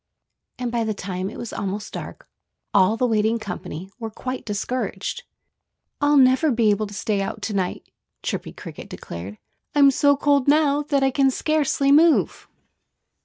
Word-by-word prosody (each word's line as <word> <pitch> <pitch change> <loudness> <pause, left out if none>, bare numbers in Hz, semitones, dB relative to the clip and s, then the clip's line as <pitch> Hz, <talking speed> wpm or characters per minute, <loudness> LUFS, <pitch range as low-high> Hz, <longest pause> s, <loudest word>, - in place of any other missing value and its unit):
And 245 -2 -3
by 235 -1 0
the 220 -1 -2
time 185 -1 -4
it - - -10
was 235 - -6
almost 205 +1 -4
dark - - -8 0.5
all 205 +2 +4
the 250 - +1
waiting 220 -1 +2
company 190 -3 -7
were 225 -1 -4
quite 255 +4 -6
discouraged. 250 - -3 0.8
"I'll 290 0 +4
never 260 +3 +5
be 230 -4 +3
able 210 +1 0
to 200 - -11
stay 205 -2 -1
out 205 +2 -5
to 215 - -2
night!" 185 -2 -2 0.4
Chirpy - - -3
Cricket - - -10
declared. 90 +5 -8 0.4
"I'm 280 -1 +6
so 285 +1 +3
cold 285 -2 +2
now 295 -1 +4
that 285 -2 0
I 270 - +3
can 270 +1 +3
scarcely 285 0 +1
move." 315 +2 +4
235 Hz, 165 wpm, -23 LUFS, 205-280 Hz, 0.8 s, I'm